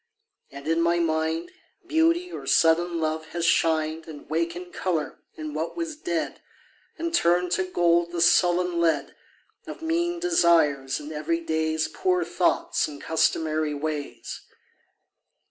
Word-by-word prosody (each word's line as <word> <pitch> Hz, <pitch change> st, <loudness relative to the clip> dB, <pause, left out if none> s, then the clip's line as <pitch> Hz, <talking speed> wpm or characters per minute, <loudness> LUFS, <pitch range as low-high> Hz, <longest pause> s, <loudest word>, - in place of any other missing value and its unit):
And 140 Hz, +1 st, -10 dB
in 165 Hz, +1 st, +2 dB
my 170 Hz, +1 st, +2 dB
mind 160 Hz, 0 st, -1 dB, 0.3 s
Beauty 335 Hz, +2 st, +2 dB
or -, -, -7 dB
sudden 170 Hz, +1 st, +3 dB
love 160 Hz, 0 st, -2 dB
has 170 Hz, -1 st, -1 dB
shined 160 Hz, -1 st, +1 dB
And 155 Hz, -2 st, -10 dB
wakened 170 Hz, +3 st, -3 dB
colour 165 Hz, -5 st, -2 dB, 0.2 s
in 155 Hz, -1 st, -6 dB
what 160 Hz, -, -4 dB
was 330 Hz, -2 st, -3 dB
dead 325 Hz, +1 st, -3 dB, 0.6 s
And 335 Hz, 0 st, -3 dB
turned 175 Hz, -, +2 dB
to 190 Hz, +1 st, +1 dB
gold 170 Hz, -1 st, +2 dB
the 175 Hz, -, -3 dB
sullen 175 Hz, +1 st, +3 dB
lead 160 Hz, -4 st, +1 dB, 0.5 s
Of -, -, -8 dB
mean 345 Hz, +2 st, 0 dB
desires 165 Hz, -, +3 dB
and 150 Hz, +1 st, -8 dB
everyday's 160 Hz, 0 st, -1 dB
Poor 180 Hz, +2 st, 0 dB
thoughts 175 Hz, +1 st, +1 dB
and 145 Hz, -2 st, -9 dB
customary 155 Hz, -1 st, 0 dB
ways. 150 Hz, 0 st, -5 dB
165 Hz, 130 wpm, -25 LUFS, 155-180 Hz, 0.6 s, sudden